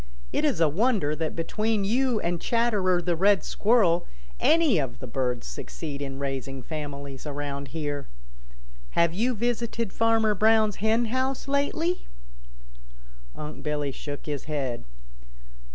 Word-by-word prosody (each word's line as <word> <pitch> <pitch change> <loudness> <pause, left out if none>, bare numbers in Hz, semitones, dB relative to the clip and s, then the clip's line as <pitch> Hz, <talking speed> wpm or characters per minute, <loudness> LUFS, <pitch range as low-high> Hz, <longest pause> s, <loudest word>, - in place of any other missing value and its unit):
It - - +1
is - - +2
a 165 - +5
wonder 180 - +1
that 160 0 -2
between 210 +5 0
you 240 +3 +2
and 170 0 -1
Chatterer 205 -7 +2
the 175 -1 +1
Red 195 +3 +4
Squirrel 200 -6 +3 0.3
any 315 - +4
of 130 -4 -3
the - - -7
birds 125 0 -2
succeed 60 - -6
in 135 -1 -4
raising 135 -1 -4
families 140 -2 -6
around 140 -1 -4
here. 145 -2 -4 0.9
Have 170 -1 +4
you 235 +7 +1
visited 235 -1 -1
Farmer 225 -1 +3
Brown's 215 0 +4
hen 220 +3 +2
house 260 +4 -1
lately?" 310 +5 0 1.3
Unc' 150 0 -7
Billy 150 -2 -1
shook 145 +1 -7
his 145 -3 -4
head. 135 - -3
170 Hz, 135 wpm, -27 LUFS, 145-225 Hz, 1.3 s, a